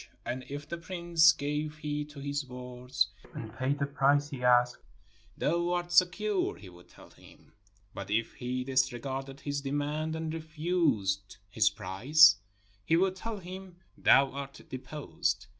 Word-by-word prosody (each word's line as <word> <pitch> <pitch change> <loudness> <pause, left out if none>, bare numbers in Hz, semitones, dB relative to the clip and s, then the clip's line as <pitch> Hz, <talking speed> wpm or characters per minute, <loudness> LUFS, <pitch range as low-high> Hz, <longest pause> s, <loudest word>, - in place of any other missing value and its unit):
And 125 +2 -3
if 145 +1 -6
the 170 +2 -5
prince 170 -1 +4
gave 150 +1 -3
heed 150 -1 -3
to 150 -1 -11
his 140 +1 -2
words 125 -2 -2 0.3
and 110 -1 -7
paid 135 +2 0
the 140 - 0
price 145 +1 +2
he 135 -4 -7
asked, 125 0 +4 0.6
"Thou 170 +2 +1
art 175 0 -2
secure," 185 +3 +2
he 95 - -12
would 90 0 -16
tell - - -16
him; - - -19 0.4
but 100 -1 -7
if 110 +2 0
he 125 +1 -3
disre 130 -2 +1
garded 135 +2 -5
his 140 -1 -3
demand 145 +3 -2
and 160 0 -3
refused 150 - -1
his 105 -1 +4
price, 115 +11 +5 0.5
he 160 +11 +3
would 190 +1 +2
tell 220 +3 -5
him, 185 0 -9 0.2
"Thou 135 0 +5
art 140 0 -7
deposed." 145 -2 -3
145 Hz, 155 wpm, -30 LUFS, 125-160 Hz, 0.6 s, price